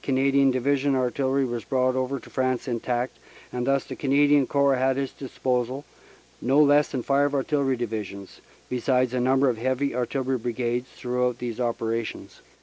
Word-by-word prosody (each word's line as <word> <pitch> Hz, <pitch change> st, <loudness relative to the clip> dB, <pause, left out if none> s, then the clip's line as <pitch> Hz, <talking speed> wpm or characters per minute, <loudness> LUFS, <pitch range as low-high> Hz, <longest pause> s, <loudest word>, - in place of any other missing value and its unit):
Canadian 135 Hz, 0 st, +3 dB
Divi 130 Hz, +2 st, +1 dB
sional 140 Hz, 0 st, +1 dB
Artillery 130 Hz, +1 st, +1 dB
was 120 Hz, -2 st, -4 dB
brought 130 Hz, -1 st, +1 dB
over 130 Hz, +1 st, -1 dB
to -, -, -15 dB
France 130 Hz, 0 st, -1 dB
intact 120 Hz, +1 st, -2 dB, 0.3 s
and 125 Hz, 0 st, -2 dB
thus 135 Hz, -1 st, +2 dB
the -, -, -8 dB
Canadian 145 Hz, 0 st, +3 dB
Corps 140 Hz, -1 st, +2 dB
had 130 Hz, +1 st, +1 dB
at 140 Hz, -, +1 dB
its 135 Hz, -, -6 dB
disposal 130 Hz, 0 st, -2 dB, 0.6 s
no 135 Hz, +4 st, +3 dB
less 145 Hz, 0 st, +5 dB
than 130 Hz, -3 st, -4 dB
five 140 Hz, +2 st, +2 dB
artillery 140 Hz, -1 st, +1 dB
divisions, 105 Hz, -4 st, -6 dB, 0.3 s
besides 125 Hz, 0 st, +1 dB
a 125 Hz, -, 0 dB
number 130 Hz, +2 st, +3 dB
of 120 Hz, -3 st, 0 dB
heavy 130 Hz, +3 st, 0 dB
artillery 130 Hz, +1 st, -1 dB
brigades, 120 Hz, +1 st, -2 dB
throughout 125 Hz, -1 st, -1 dB
these 120 Hz, -1 st, -5 dB
operations. 115 Hz, -2 st, -3 dB
130 Hz, 165 wpm, -25 LUFS, 125-135 Hz, 0.6 s, less